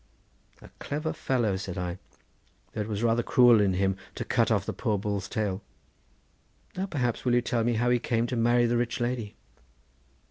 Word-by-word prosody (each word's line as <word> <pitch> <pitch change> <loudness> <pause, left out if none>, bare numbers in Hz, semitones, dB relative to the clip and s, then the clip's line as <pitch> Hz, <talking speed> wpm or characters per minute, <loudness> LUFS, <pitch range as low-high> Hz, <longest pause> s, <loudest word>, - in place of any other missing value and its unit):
"A - - -13
clever 150 +2 -3
fellow," 120 -7 0
said 95 -1 -6
I; 90 0 -3 0.7
"though - - -2
it 105 - -3
was 105 0 -3
rather 115 0 +3
cruel 120 -2 +5
in 100 -2 +2
him 95 +1 +1 0.2
to - - -4
cut - - +2
off - - +1
the - - -3
poor 105 - -1
bull's 100 -1 -3
tail. 105 -3 -2 1.1
Now, 190 +2 -2
perhaps, 125 - -1
you 125 - +1
will 120 - +4
tell 120 -2 0
me 120 +1 +1
how 120 +2 +2
he 125 - +3
came 115 -1 0
to 125 - -3
marry 120 +1 +3
the 120 0 +1
rich 120 0 -1
lady?" 120 -3 -2
115 Hz, 190 wpm, -28 LUFS, 100-120 Hz, 1.1 s, cruel